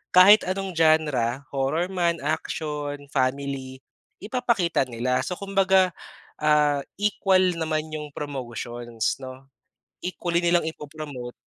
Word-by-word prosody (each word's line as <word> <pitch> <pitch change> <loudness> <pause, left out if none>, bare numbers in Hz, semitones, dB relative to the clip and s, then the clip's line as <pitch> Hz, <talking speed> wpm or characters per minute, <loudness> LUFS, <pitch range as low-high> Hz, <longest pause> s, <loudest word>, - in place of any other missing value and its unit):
kahit 200 +4 +8
anong 190 +1 -2
genre, 150 -6 +2
horror 140 +6 0
man, 170 -2 0
action, 150 -1 -2 0.2
family, 130 0 -2 0.4
ipapakita 210 - +1
nila. 125 +1 -1
So 180 - -3
kumbaga, 190 -1 +3 0.5
ah, 150 -2 +3 0.2
equal 190 -3 +2
naman 155 -1 -1
yung 150 -2 -6
promotions, 120 -4 -4
'no. 130 0 -10 0.6
Equally 175 -1 -1
nilang 175 0 +4
ipo-promote. 145 -5 -8
150 Hz, 105 wpm, -25 LUFS, 135-180 Hz, 0.6 s, kahit